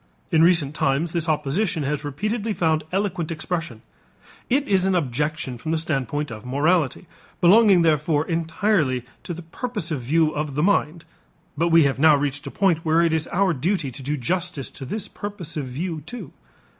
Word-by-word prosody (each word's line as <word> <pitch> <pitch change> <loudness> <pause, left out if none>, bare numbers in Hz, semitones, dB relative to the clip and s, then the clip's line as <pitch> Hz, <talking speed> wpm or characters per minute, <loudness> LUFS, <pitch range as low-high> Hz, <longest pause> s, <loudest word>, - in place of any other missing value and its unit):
In 160 -2 +4
recent 165 -5 +4
times 150 +3 0
this 165 -1 -1
opposition 155 +3 0
has 145 +1 -2
repeatedly 210 - -2
found 160 -2 +1
eloquent 185 -4 -1
expression. 165 -7 -4 0.7
It 275 +3 +1
is 190 -2 +3
an 190 - +2
objection 150 -2 -2
from 155 - -6
the 165 - +1
standpoint 145 -2 -2
of 110 -1 -8
morality, 145 +4 +1 0.3
belonging 195 0 +6
therefore 155 -1 +2
entirely 165 - 0 0.2
to 175 - -6
the 175 - -9
purposive 165 - -4
view 155 +5 +2
of 150 -2 -3
the 150 - +1
mind, 170 -4 +1 0.5
but 165 +4 +1
we 165 -1 +6
have 135 -2 0
now 155 0 +6
reached 145 0 -2
a - - -3
point 175 0 +2
where 165 0 +3
it 165 -1 +2
is 160 0 0
our 190 -1 +1
duty 160 0 -1
to 125 - -9
do 145 +3 -2
justice 165 +1 -2
to 135 - -8
this 210 +11 -4
purposive 175 -8 -6
view 160 +5 -4
too. 230 +1 -8
160 Hz, 175 wpm, -23 LUFS, 145-180 Hz, 0.7 s, belonging